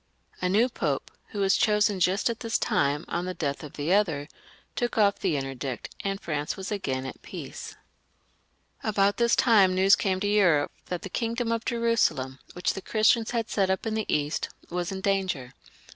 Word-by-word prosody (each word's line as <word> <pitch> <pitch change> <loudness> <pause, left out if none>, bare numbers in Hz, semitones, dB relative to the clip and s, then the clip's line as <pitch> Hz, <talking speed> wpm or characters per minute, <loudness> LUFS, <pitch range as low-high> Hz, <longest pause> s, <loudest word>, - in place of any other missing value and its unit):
A 180 - +1
new 215 +6 +4
Pope, 150 - -2 0.2
who 205 - -4
was 195 0 +4
chosen 210 -2 +2
just 185 +3 +2
at 235 -1 -2
this 230 -2 0
time, 145 +2 +1
on 175 +1 -2
the 185 0 -4
death 140 -3 -2
of 150 - -9
the 150 +5 0
other, 160 -8 +1 0.5
took 240 -2 -1
off 205 -2 +3
the 175 -7 0
interdict, 135 -2 -5
and 195 0 -2
France 150 -4 -3
was 190 +1 -5
again 135 -10 -2
at 130 - -8
peace. - - -8 1.1
About 200 -1 +2
this 235 -1 +3
time 200 -6 +5
news 190 +1 +6
came 190 -2 0
to 205 - -1
Europe 180 -8 +3 0.2
that 180 -1 -4
the - - -4
kingdom 230 +2 -1
of 230 0 -1
Jerusalem, 230 - +1
which 180 - 0
the 195 - -6
Christians 220 +2 +3
had 230 -2 -1
set 195 -2 +1
up 190 +3 0
in 225 - -1
the 220 -1 -2
East, 150 +1 0 0.2
was 175 0 -2
in 190 0 -4
danger. 185 -10 -1
195 Hz, 190 wpm, -27 LUFS, 150-215 Hz, 1.1 s, news